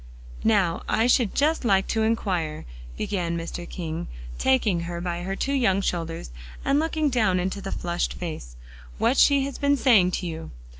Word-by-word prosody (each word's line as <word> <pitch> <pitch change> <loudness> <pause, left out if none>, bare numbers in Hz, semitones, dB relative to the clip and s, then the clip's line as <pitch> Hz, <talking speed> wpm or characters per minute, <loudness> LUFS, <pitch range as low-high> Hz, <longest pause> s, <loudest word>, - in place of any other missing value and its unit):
"Now, 200 -6 +2
I 225 - +2
should 245 -3 +3
just 310 +2 +2
like 195 -4 +3
to 220 - +1
inquire," 185 -9 -1 0.3
began 175 -4 -2
Mr. 170 +1 -6
King, 165 -2 -5 0.3
taking 235 -9 +2
her 170 0 -4
by 175 0 -3
her 190 +2 -3
two 275 - -1
young 225 -8 +2
shoulders 165 - -3 0.3
and 275 +1 +3
looking 315 -1 0
down 215 -7 +2
into 190 +2 -2
the 195 - -5
flushed 175 0 -2
face, 155 - -6 0.4
"what 260 - +2
she 280 -1 +5
has 280 - -6
been 285 0 +3
saying 220 -10 +5
to - - -2
you." 165 -1 -5
195 Hz, 170 wpm, -25 LUFS, 170-245 Hz, 0.4 s, she